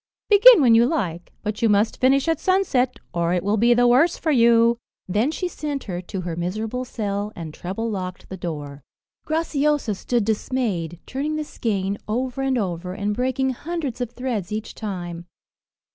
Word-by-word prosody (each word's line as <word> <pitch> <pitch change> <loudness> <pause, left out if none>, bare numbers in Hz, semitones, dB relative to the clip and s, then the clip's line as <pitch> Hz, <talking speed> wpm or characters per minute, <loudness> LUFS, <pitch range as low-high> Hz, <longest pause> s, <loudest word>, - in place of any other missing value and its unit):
Begin 420 -1 +9
when 240 -4 +6
you 230 +1 +6
like, 180 - -3
but 210 -1 -3
you 230 - +3
must 210 +4 +2
finish 270 +3 +3
at 325 -2 +1
sunset, 320 -10 +1 0.2
or 170 0 0
it 175 - -1
will 205 +2 +1
be 240 +3 +4
the 245 0 +4
worse 280 +8 +4
for 320 - 0
you." 235 -2 +4 0.3
Then 210 +8 +1
she 360 +3 -2
sent 295 -5 -4
her 180 -3 -4
to 185 +1 -5
her 170 -2 -4
miserable 215 +8 -3
cell, 205 -3 -3
and 160 -3 -7
treble 195 +8 -4
locked 185 -4 -5
the 190 - -7
door. 150 -5 -6 0.5
Graciosa 300 -6 +1
stood 235 +3 -1
dismayed, 210 -7 -1
turning 290 +4 -3
the 310 - -2
skein 200 -8 -2
over 250 +4 -2
and 270 -1 +1
over, 180 -3 -3
and 205 +1 -2
breaking 260 +2 0
hundreds 290 -2 -4
of 245 - -2
threads 240 -7 -4
each 215 +1 -4
time. 175 -5 -6
230 Hz, 175 wpm, -23 LUFS, 190-265 Hz, 0.5 s, Begin